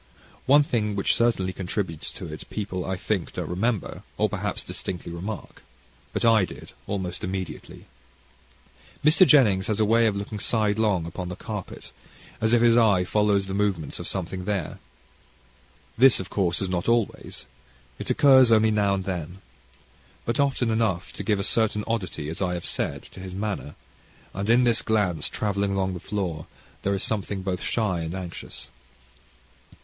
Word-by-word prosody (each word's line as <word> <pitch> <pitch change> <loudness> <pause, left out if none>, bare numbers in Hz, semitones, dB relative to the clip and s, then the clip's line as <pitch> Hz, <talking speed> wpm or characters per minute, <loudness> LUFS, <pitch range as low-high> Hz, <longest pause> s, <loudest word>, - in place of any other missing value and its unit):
One 145 +2 +7
thing 105 -7 -1
which 100 - +2
certainly 105 -6 +1
contributes 90 -3 -3
to - - -7
it, - - -9
people 95 -4 -3
I 95 - -1
think 95 -1 -2
don't - - -4
remember; 105 +4 -1 0.2
or, - - +2
perhaps, - - -3
distinctly 90 -2 -5
remark. 95 +5 -6 0.5
But - - -1
I 115 -3 +5
did, - - -7 0.2
almost 95 -3 -3
immediately. 95 +1 -5 1.2
Mr. 165 +4 +7
Jennings 110 -9 +5
has 110 -2 0
a 110 - +4
way 115 +2 +4
of 105 - 0
looking 100 +1 -5
sidelong 105 -5 +1
upon 90 +2 -5
the 90 - -5
carpet, 105 -1 -7 0.5
as 110 0 +2
if 120 0 +4
his 115 -1 +6
eye 105 -6 +4
followed 105 +1 +2
the 95 0 -5
movements 100 -5 -1
of - - -5
something 95 0 -3
there. 100 -2 -2 1.2
This, 135 0 +7
of 95 -1 -6
course, 90 -2 0
is - - -1
not 90 +3 -1
always. 115 -3 -1 0.5
It - - -4
occurs 130 -3 +6
now 105 -3 +4
and 95 - -3
then. 90 -2 -4 0.9
But 115 +2 -1
often 135 -4 +2
enough 110 -6 0
to - - -6
give 105 -3 +1
a - - -1
certain 105 0 +1
oddity, 95 -9 -3
as 80 +4 -5
I 90 -2 0
have 85 - -5
said, - - -2
to - - -12
his 95 0 -7
manner, 100 -7 -4 0.6
and 100 +3 -3
in 120 +2 +5
this 120 -2 +3
glance 95 -8 0
travelling 100 -1 -1
along 95 -1 0
the 90 - -5
floor 90 -5 -3 0.3
there 100 0 0
is 95 - -1
something 100 -2 -2
both 95 -1 -2
shy 105 -7 0
and 80 +2 -4
anxious. 90 -2 -7
100 Hz, 165 wpm, -25 LUFS, 90-110 Hz, 1.2 s, One